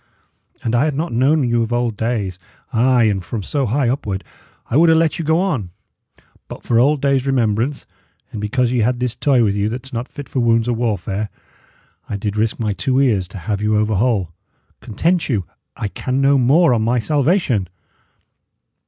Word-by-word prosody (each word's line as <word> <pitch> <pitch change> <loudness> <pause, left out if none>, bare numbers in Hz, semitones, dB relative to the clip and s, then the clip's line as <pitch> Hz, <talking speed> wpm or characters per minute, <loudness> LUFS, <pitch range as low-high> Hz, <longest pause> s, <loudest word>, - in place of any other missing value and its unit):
An 115 - -1
I 120 +4 +3
had 150 -3 -1
not 155 -1 -2
known 135 +3 +2
you 120 0 +1
of 115 0 -2
old 120 -2 0
days 105 -5 -2 0.3
ay, 125 +1 +3
and 100 -4 +1
from 105 +3 -5
so 140 +6 -1
high 130 +4 +1
upward 105 -6 -2 0.4
I - - -3
would 165 +3 +5
'a' 160 - +5
let 160 0 +1
you - - -1
go 160 +2 +2
on; 145 - -1 0.8
but - - -10
for 115 - +2
old 140 +3 +2
days' 140 -1 +1
remembrance, 125 +1 0 0.5
and 105 - -6
because 120 +3 0
ye 125 - +1
had 120 +2 +1
this 125 -1 -2
toy 130 -1 +2
with 100 -3 +2
you 100 +1 0
that's 125 +3 -7
not 120 +2 -3
fit 145 - -9
for 130 - -3
wounds 115 -1 +2
or 120 - +1
warfare, 105 -3 -2 0.8
I 100 - -2
did 105 0 -3
risk 110 +1 -1
my 105 -3 -1
two 130 +6 -2
poor 135 +2 +4
ears 105 -9 +1
to 90 - -10
have 100 +2 -3
you 105 0 +1
over 110 +1 +1
whole. 100 -5 +1 0.5
Content 165 - -1
you; 105 -8 0 0.3
I 105 - -2
can 130 +6 -3
no 140 0 +4
more, 140 +4 +4
on 115 - +1
my 120 +3 +1
salvation!" 140 - +1
120 Hz, 200 wpm, -19 LUFS, 105-135 Hz, 0.8 s, would